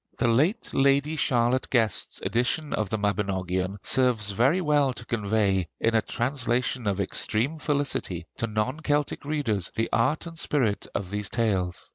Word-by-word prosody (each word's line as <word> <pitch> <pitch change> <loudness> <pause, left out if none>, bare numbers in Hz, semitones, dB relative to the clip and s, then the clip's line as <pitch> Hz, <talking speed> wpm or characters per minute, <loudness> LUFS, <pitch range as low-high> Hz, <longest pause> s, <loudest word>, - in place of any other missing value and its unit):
The - - +1
late 155 - +1
Lady 140 +3 +3
Charlotte 125 -3 +1
Guest's 115 -6 0
edition 125 +6 0
of 110 -3 -1
the 110 - -1
'Mabinogion' 95 -2 -1
serves 120 -6 +2
very 130 - +3
well 145 -5 +2
to 120 - -8
convey, 100 -5 0
in 115 - +1
a 110 - +4
translation 120 -1 -1
of 100 -1 0
extreme 115 - 0
felicity, 145 -2 -1
to 115 - -1
non 110 +7 -2
Celtic 145 -2 -1
readers 135 - -1
the 115 - 0
art 150 +9 +1
and 165 -1 -7
spirit 120 -12 0
of 95 -2 -3
these 105 -1 -2
tales. 95 -6 -1
115 Hz, 155 wpm, -26 LUFS, 105-140 Hz, -, a